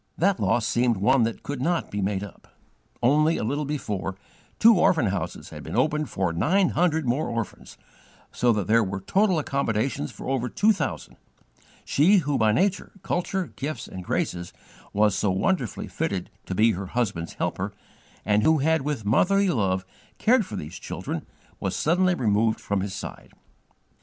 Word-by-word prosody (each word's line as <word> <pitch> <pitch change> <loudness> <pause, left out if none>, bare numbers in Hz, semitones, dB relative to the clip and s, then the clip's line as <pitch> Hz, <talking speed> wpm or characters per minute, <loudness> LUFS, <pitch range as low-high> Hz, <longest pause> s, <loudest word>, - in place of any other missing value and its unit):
That 195 +2 +2
loss 110 +3 +1
seemed 120 -1 +2
one 120 +7 +3
that 115 - -4
could 145 -3 -4
not 170 +4 0
be 105 - -2
made 100 0 -1
up. 100 - -11 0.6
Only 155 +6 +4
a - - -2
little 145 +7 -1
before, 105 -10 -3 0.4
two 230 +1 +7
orphan 160 -8 +4
houses 95 -4 -3
had - - -8
been - - -6
opened 150 +3 +1
for 95 -3 -1
nine 180 - +2
hundred 160 -3 +1
more 125 +5 0
orphans, 115 -2 -5 0.5
so 120 - +2
that 105 -4 0
there 115 +4 +4
were 95 -1 -3
total 190 - +2
accommodations 130 - -1
for - - -9
over 130 -2 -1
two 210 - +3
thousand; - - -4 0.7
she, 180 +9 +4
who 145 -6 0
by 110 -1 +4
nature, 190 - 0
culture, 180 0 -2
gifts, 140 -2 -4
and 95 - -8
graces, 85 0 -2 0.4
was 105 0 +3
so 105 +1 +1
wonderfully 115 - -1
fitted - - -3 0.2
to 95 - -3
be 110 +4 +4
her 95 -1 -4
husband's 95 -7 -2
helper, - - -2 0.5
and 105 +1 +3
who 160 +6 +4
had 160 +2 +2
with 140 -6 -3
motherly 195 - +3
love 95 - 0 0.3
cared 230 -2 +3
for 105 - -6
these 85 -1 -6
children, - - -5 0.3
was - - -2
suddenly 180 +3 +2
removed 110 -4 +1
from 100 -1 -1
his 95 0 -4
side. - - -8
120 Hz, 170 wpm, -25 LUFS, 100-160 Hz, 0.7 s, two